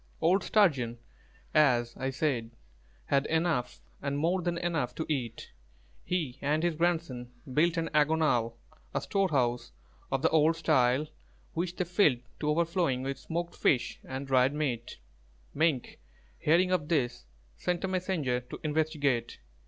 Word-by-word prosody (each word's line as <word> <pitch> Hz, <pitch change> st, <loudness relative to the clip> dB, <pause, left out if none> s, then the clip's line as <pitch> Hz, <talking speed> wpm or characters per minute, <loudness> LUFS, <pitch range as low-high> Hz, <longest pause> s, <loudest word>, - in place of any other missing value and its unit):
Old 180 Hz, +3 st, +3 dB
Sturgeon, 135 Hz, -, +2 dB, 0.6 s
as 120 Hz, -6 st, +3 dB
I 130 Hz, -, -2 dB
said, 135 Hz, -4 st, -1 dB, 0.6 s
had 140 Hz, 0 st, +1 dB
enough 160 Hz, -6 st, 0 dB, 0.2 s
and 140 Hz, 0 st, -2 dB
more 170 Hz, +5 st, +1 dB
than 175 Hz, 0 st, -1 dB
enough 165 Hz, -7 st, -1 dB
to 160 Hz, -, -3 dB
eat. 125 Hz, -7 st, -3 dB, 0.5 s
He 160 Hz, -9 st, -2 dB
and 150 Hz, +3 st, +1 dB
his 175 Hz, -1 st, +2 dB
grandson 160 Hz, -7 st, -1 dB, 0.2 s
built 165 Hz, +4 st, +3 dB
an 165 Hz, 0 st, -1 dB
"āgonal," 150 Hz, -6 st, +2 dB, 0.4 s
a -, -, +1 dB
storehouse 130 Hz, -, 0 dB, 0.4 s
of 135 Hz, +1 st, 0 dB
the 160 Hz, -, +5 dB
old 160 Hz, +1 st, +4 dB
style, 140 Hz, -4 st, +2 dB, 0.5 s
which 175 Hz, +1 st, -2 dB
they 180 Hz, -, -1 dB
filled 165 Hz, -8 st, +3 dB, 0.2 s
to 150 Hz, -, -1 dB
overflowing 165 Hz, -4 st, +1 dB
with 135 Hz, 0 st, -3 dB
smoked 170 Hz, +6 st, -4 dB
fish 125 Hz, -, +1 dB
and 130 Hz, +1 st, -5 dB
dried 135 Hz, +1 st, +3 dB
meat. 125 Hz, -6 st, -2 dB, 0.6 s
Mink, 155 Hz, -5 st, 0 dB, 0.4 s
hearing 175 Hz, +4 st, +3 dB
of 170 Hz, -5 st, +1 dB
this, 120 Hz, -, 0 dB, 0.3 s
sent 180 Hz, -, -2 dB
a -, -, +1 dB
messenger 180 Hz, -9 st, -1 dB
to 125 Hz, -, -9 dB
investigate. 150 Hz, -6 st, 0 dB
150 Hz, 140 wpm, -30 LUFS, 125-170 Hz, 0.6 s, the